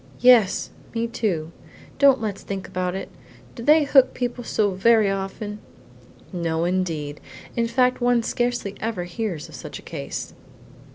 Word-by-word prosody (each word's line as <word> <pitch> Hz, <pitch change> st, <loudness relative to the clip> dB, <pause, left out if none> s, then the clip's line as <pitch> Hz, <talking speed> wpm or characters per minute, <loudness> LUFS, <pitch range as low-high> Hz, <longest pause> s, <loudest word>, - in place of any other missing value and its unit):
"Yes; 240 Hz, -6 st, +5 dB, 0.2 s
me, 230 Hz, 0 st, 0 dB
too. 180 Hz, -9 st, -2 dB, 0.5 s
Don't 275 Hz, -2 st, +6 dB
let's 210 Hz, -3 st, -3 dB
think 195 Hz, -1 st, -5 dB
about 185 Hz, -1 st, -2 dB
it. 195 Hz, -, -5 dB, 0.4 s
Do 235 Hz, -, -9 dB
they 300 Hz, +5 st, +5 dB
hook 270 Hz, -2 st, +4 dB
people 245 Hz, 0 st, -3 dB
so 210 Hz, -3 st, +1 dB
very 210 Hz, +2 st, +4 dB
often?" 195 Hz, +2 st, -4 dB, 0.7 s
"No 165 Hz, -2 st, -1 dB
indeed, 165 Hz, -5 st, -2 dB, 0.4 s
in 235 Hz, -1 st, +1 dB
fact 250 Hz, +2 st, +2 dB
one 245 Hz, -1 st, +3 dB
scarcely 240 Hz, -4 st, -1 dB
ever 220 Hz, -5 st, -2 dB
hears 175 Hz, -3 st, -4 dB
of -, -, -15 dB
such -, -, -7 dB
a -, -, -13 dB
case." 70 Hz, -, -6 dB
210 Hz, 150 wpm, -23 LUFS, 185-240 Hz, 0.7 s, Don't